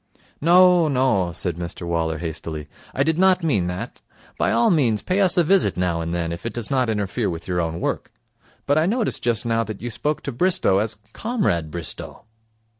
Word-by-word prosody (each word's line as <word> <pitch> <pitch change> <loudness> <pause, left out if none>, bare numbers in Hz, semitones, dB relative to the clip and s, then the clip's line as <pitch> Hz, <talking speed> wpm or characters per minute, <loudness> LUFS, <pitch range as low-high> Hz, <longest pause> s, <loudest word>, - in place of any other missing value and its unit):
'No, 175 +1 +6
no,' 125 - +1
said 85 -1 -3
Mr 85 0 -6
Waller 80 -2 -1
hastily, 80 -2 -5 0.3
'I 135 - +2
did 160 +2 0
not 190 -2 +4
mean 105 - +1
that. 90 0 -6 0.3
By - - +1
all 115 +1 +3
means 120 - +2
pay 190 +2 +1
us 185 -2 +3
a 175 - +5
visit 190 +4 +2
now 90 -2 0
and 85 0 -3
then, 85 -1 -2
if 85 0 -6
it 115 - -4
does 120 0 -4
not 130 -3 +1
interfere 105 +1 -1
with 85 -1 -6
your 90 -1 0
own 80 0 -3
work. - - -3 0.5
But 145 +2 +3
I 160 - +2
noticed 225 +2 0
just 115 -2 0
now 115 0 +1
that 110 -2 -7
you 120 +1 -5
spoke 150 +6 -2
to 140 - -3
Bristow 175 - +2
as 110 0 -2 0.2
Comrade 200 - -1
Bristow.' 85 +6 -7
115 Hz, 200 wpm, -22 LUFS, -, 0.5 s, No